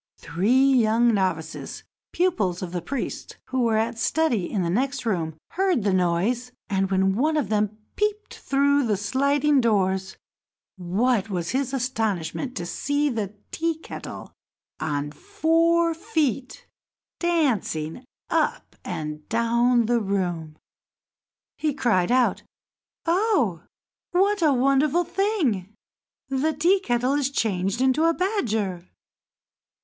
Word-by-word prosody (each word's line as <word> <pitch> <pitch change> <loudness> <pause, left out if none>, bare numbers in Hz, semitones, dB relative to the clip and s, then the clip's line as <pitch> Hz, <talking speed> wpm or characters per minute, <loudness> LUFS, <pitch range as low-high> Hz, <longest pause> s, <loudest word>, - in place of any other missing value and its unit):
Three 215 - +2
young 235 -1 +4
novices, 185 -6 -2 0.3
pupils 210 - 0
of 175 - -5
the 175 -1 -3
priest, 260 +9 -5
who 260 0 0
were 230 -2 +2
at 230 +1 -1
study 240 - +1
in 195 -4 0
the 170 - -1
next 260 +5 -1
room, 165 -7 -1
heard 365 - +1
the 200 -2 +1
noise; 185 +8 0 0.2
and, 195 -1 +1
when 190 0 +2
one 310 +7 +1
of 280 -10 -1
them 210 0 0 0.2
peeped 420 0 -1
through 280 -1 +1
the 210 -2 +1
sliding 280 +6 +2
doors, 190 -4 0 0.6
what 205 +5 0
was 175 -4 -2
his 265 0 -1
astonishment 230 - -2
to 175 - -3
see 285 +10 0
the 210 -3 -3 0.2
Tea 330 -1 -1
kettle 320 - -9 0.5
on 145 -1 -2
four 335 - +2
feet 315 - -2 0.5
dancing 245 - 0 0.2
up - - -1
and 155 -4 -5
down 235 +1 +2
the 240 +1 +2
room! 175 -6 -2 1.0
He 300 -3 0
cried 235 -8 +1
out: 250 -1 +2 0.6
"Oh! 335 - +1 0.5
what 395 +2 +2
a 310 -3 +4
wonderful 275 +5 +3
thing! 300 - -1 0.5
The 275 +4 0
Tea 345 +7 +3
kettle 250 -5 0
is 285 -2 +1
changed 200 -4 -1
into 265 +5 +3
a 330 0 +3
badger!" 220 - -1
240 Hz, 125 wpm, -24 LUFS, 190-295 Hz, 1.0 s, young